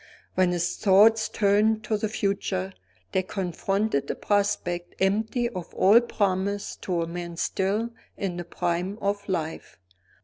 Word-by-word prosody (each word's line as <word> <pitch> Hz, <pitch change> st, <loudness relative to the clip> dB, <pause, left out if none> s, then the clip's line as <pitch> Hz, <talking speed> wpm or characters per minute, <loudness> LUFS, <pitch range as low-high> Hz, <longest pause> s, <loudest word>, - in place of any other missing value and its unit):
When 185 Hz, -1 st, +3 dB
his 175 Hz, -1 st, -1 dB
thoughts 220 Hz, +3 st, +5 dB
turned 215 Hz, +1 st, +2 dB
to 215 Hz, -, 0 dB
the 210 Hz, 0 st, -1 dB
future, 195 Hz, -, -1 dB, 0.4 s
they 190 Hz, -, +2 dB
confronted 190 Hz, -3 st, -1 dB
a -, -, -1 dB
prospect 175 Hz, -4 st, -1 dB
empty 220 Hz, +5 st, +1 dB
of 180 Hz, -7 st, -7 dB
all 210 Hz, +5 st, +6 dB
promise 200 Hz, -3 st, -1 dB
to 175 Hz, -3 st, -1 dB
a -, -, -4 dB
man 170 Hz, 0 st, -6 dB
still 205 Hz, +7 st, 0 dB, 0.3 s
in 185 Hz, -3 st, -3 dB
the 175 Hz, -, -3 dB
prime 175 Hz, +3 st, -2 dB
of 200 Hz, 0 st, -2 dB
life. 165 Hz, -3 st, -3 dB
195 Hz, 140 wpm, -26 LUFS, 175-210 Hz, 0.4 s, all